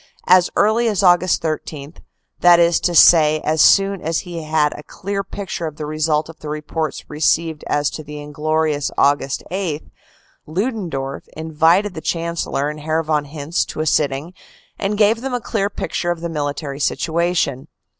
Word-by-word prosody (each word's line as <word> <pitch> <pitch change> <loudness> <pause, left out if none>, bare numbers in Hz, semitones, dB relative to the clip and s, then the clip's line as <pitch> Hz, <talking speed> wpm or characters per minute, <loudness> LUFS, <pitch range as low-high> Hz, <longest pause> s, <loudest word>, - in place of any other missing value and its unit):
As 180 -1 +5
early 220 +3 +3
as 210 -3 +1
Aug. 175 -1 +6
13, 155 -2 -2 0.5
that 175 -1 +6
is 170 0 +4
to 175 - 0
say 155 -2 +6
as 155 0 +1
soon 195 -1 +4
as 165 +1 -1
he 175 -3 -7
had 155 -1 +1
a - - -9
clear 200 +4 -5
pic 195 0 -7
ture 165 - -3
as 155 - -7
the 150 - -6
result 155 0 0
of 165 - -13
the 150 - -7
reports 155 +1 -4
received 155 +1 0
as 145 -1 0
to 155 - -7
the 150 0 -8
inglorious 150 0 -1
Aug. 145 +1 +4 0.3
8, 180 -5 -3 0.6
Ludendorff 165 - -3
invited 160 +5 +2
the 160 - -7
Chancellor 165 -3 -2
and 150 0 -5
Herr 160 +2 -1
von 150 -2 0
Hintze 150 +3 -2
to - - -7
a 155 - 0
sitting, 145 +2 0 0.5
and 205 +1 -1
gave 215 +2 +3
them 260 -1 -3
a - - -1
clear 210 -4 -1
picture 175 -3 -3
of 175 -1 -2
the 170 - -3
mili 145 -3 -2
tary 140 -3 -6
situation. 165 -4 0
160 Hz, 175 wpm, -19 LUFS, 150-180 Hz, 0.6 s, Aug